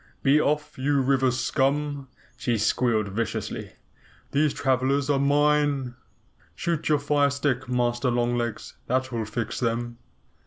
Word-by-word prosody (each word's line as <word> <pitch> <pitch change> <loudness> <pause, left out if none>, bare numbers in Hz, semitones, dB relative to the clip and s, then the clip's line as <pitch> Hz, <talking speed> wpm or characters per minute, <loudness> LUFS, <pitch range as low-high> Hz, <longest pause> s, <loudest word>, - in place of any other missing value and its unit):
Be 145 +2 +5
off, 150 -1 -1
you 140 +1 +2
river 135 0 +2
scum!" 140 +3 0 0.3
she 120 -2 -1
squealed 110 0 +1
viciously. 110 +3 -4 0.6
"These 145 0 +2
travelers 135 +2 +1
are 140 - +2
MINE. 145 -2 +2 0.6
Shoot 165 -3 -2
your 150 - +4
fire 145 0 +2
stick, 140 -3 -1
Master 120 0 +1
Long 120 0 +1
Legs. 120 -2 -4
That 130 +1 0
will 115 -2 -2
fix 110 +1 -4
them." 120 -1 -2
130 Hz, 130 wpm, -25 LUFS, 120-145 Hz, 0.6 s, Be